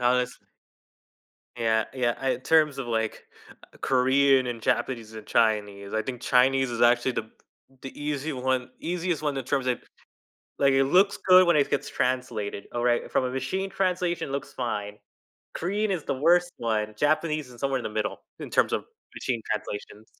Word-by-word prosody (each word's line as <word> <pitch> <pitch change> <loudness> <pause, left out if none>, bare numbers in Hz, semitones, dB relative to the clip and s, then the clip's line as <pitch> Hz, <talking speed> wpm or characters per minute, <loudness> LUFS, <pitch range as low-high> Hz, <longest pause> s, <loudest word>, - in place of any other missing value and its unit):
honestly 125 0 0 1.1
Yeah 110 -1 +2
yeah, 125 +1 -1
in 125 -1 -1
terms 155 -1 +3
of, 130 - -4
like, 110 -1 -2 0.5
Korean 130 0 +3
and 120 -2 -4
Japanese 115 -2 -1
and 110 -1 -9
Chinese, 105 -3 0
I 110 - +1
think 125 +1 -5
Chinese 130 +1 +3
is 115 - -3
actually 120 +2 +4
the 110 -1 -4 0.5
the 135 - -9
easy 150 +1 -2
one 130 -1 -1
easiest 175 -1 -2
one 145 -2 0
in 135 - -3
terms 135 -2 -1
of 125 - +1 0.8
like, 140 -1 +4
it 135 0 +4
looks 195 +8 +4
good 185 -1 +8
when 170 - +4
it 145 -2 +3
gets - - -1
translated, 125 -6 -2
alright, 120 0 +1
from - - +2
a 125 - -2
machine 185 +10 -2
translation 180 -5 -1
looks 140 0 -4
fine. 105 -4 -3 0.6
Korean 205 +5 -1
is 175 -6 -2
the - - -1
worst 175 +6 +3
one. 110 -2 -1
Japanese 155 0 +1
is 120 -1 -14
somewhere 135 -1 0
in - - -7
the - - -3
middle, 105 0 -2 0.2
in - - -7
terms - - +2
of - - -1 0.3
machine 120 -3 -2
translation. 105 +1 -5
130 Hz, 170 wpm, -26 LUFS, 115-150 Hz, 1.1 s, good